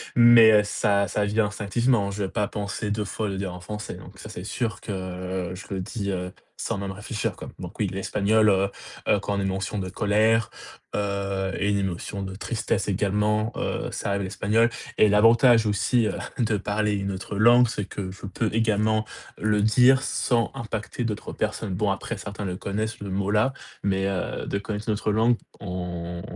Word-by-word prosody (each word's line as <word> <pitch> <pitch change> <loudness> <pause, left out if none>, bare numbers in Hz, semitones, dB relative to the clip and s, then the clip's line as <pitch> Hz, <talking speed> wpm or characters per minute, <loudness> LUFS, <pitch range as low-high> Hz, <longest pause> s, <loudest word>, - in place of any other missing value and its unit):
mais 120 -2 +8
heu, 105 -1 +6
ça 100 -1 +1
ça 105 - 0
vient 105 +1 +2
instinctivement, 105 +1 +1
je 100 +1 -3
vais 95 - -2
pas 105 0 0
penser 105 0 -3
2 105 0 -1
fois 105 +1 -3
le 95 - -3
dire 95 -1 -3
en 90 - -9
français, 105 +4 -6
donc - - -13
ça, - - -9
c'est 90 - -7
sûr 110 +2 -2
que 95 -2 -4
je 95 +2 -8
le 95 - -2
dis, 100 +1 -3
heu, 90 -1 -3 0.3
sans - - -2
même 100 -1 -4
réfléchir, 105 +2 -3
quoi, - - -8
donc 90 +2 -9
oui, 105 - +2
l'espagnol, 105 +3 +2
heu 95 0 +3 0.4
heu, 105 - +4
quand 100 0 -2
une 100 - 0
émotion 95 +2 -2
de 95 -1 -3
colère, 110 +3 +2 0.4
heu 100 -1 -1
et 100 - +1
une 100 0 +2
émotion 95 +1 -3
de 95 -1 -5
tristesse 110 -1 -2
également, 105 +2 +1
heu, - - -2
ça 100 - -3
a 100 - +1
l'espagnol 105 +4 +2 0.3
et 105 - +7
l'avantage 115 +2 +6
aussi, 110 +3 +2
heu, - - 0 0.2
de 110 -3 +1
parler 105 +1 0
une 100 -1 -1
autre 95 +2 -5
langue, 120 +3 +6
c'est 105 -3 -3
que 95 -1 -5
je 95 - -10
peux 110 +3 -1
également 110 -1 +2 0.3
le 105 -1 +2
dire 125 +4 +5
sans 120 -3 +1
impacter 110 +1 -4
d'autres 110 -3 -3
personnes, 100 -4 -2
bon, 100 +3 0
après 100 +3 -3
certains 100 +2 -6
le 90 -1 -3
connaissent 110 +4 -3
le 100 -1 -6
mot-là, 105 +6 +1 0.3
mais 95 -1 +1
heu, 95 -2 -2
de 100 - -2
connaître 105 0 -5
l'autre 105 0 0
langue, 115 +3 +3 0.2
on 90 -2 -5
105 Hz, 190 wpm, -25 LUFS, 95-110 Hz, 0.4 s, mais